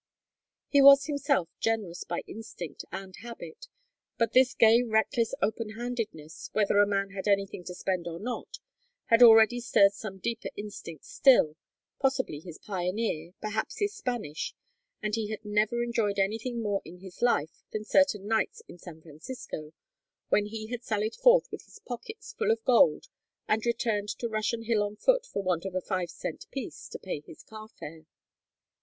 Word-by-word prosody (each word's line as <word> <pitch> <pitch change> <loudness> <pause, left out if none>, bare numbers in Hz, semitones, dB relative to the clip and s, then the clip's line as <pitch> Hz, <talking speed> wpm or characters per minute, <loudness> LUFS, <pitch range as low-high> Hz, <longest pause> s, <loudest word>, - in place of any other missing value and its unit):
He 280 - +4
was 275 0 +9
himself 285 - 0
generous 210 -6 -1
by 175 - -4
instinct 185 -8 -8
and 190 -1 -7
habit, 345 - -10 0.5
but 230 -1 +1
this 260 0 +5
gay 230 +1 +6
reckless 230 +1 +1
openhandedness, 220 -6 -4
whether 205 -1 +3
a 205 - +6
man 195 -1 -1
had 195 +1 -5
anything 195 -2 0
to 180 - -7
spend 180 -2 -2
or 170 0 -5
not, 250 - -5 0.5
had 230 +1 +6
already 225 0 +8
stirred 200 -5 +4
some 195 -1 -7
deeper 230 +4 -3
instinct 200 -7 -8
still, 240 - +4 0.4
possibly 265 - 0
his 165 0 -10
pioneer, 180 -3 -3
perhaps 215 0 -3
his 410 0 0
Spanish, 240 - -4 0.5
and 210 - -2
he 220 -1 -1
had 215 0 -6
never 210 +3 +1
enjoyed 225 -4 0
anything 225 +4 -1
more 205 -2 0
in 170 +3 -11
his 190 +1 -12
life 160 -11 +1
than 215 - -3
certain 215 -5 +3
nights 220 0 0
in 175 - -13
San 160 -3 -12
Francisco, 155 - -8 0.6
when 205 0 +3
he 215 0 -6
had 240 +2 -6
sallied 215 -2 -1
forth - - +5
with - - -8
his - - -15
pockets 430 - -8
full 450 -2 -1
of 450 0 +1
gold 230 -11 +4 0.4
and 220 +2 +1
returned 220 -3 0
to 235 - -3
Russian 220 +1 -2
Hill 225 -2 +1
on 205 0 -2
foot - - +2
for 200 - -4
want 180 -3 0
of 190 -1 -5
a - - +2
five 185 -2 -2
cent - - -6
piece 270 -4 -7
to - - -7
pay 185 -5 -5
his 150 +1 -14
car 215 -1 -11
fare. 160 -6 -11
215 Hz, 170 wpm, -29 LUFS, 190-240 Hz, 0.6 s, was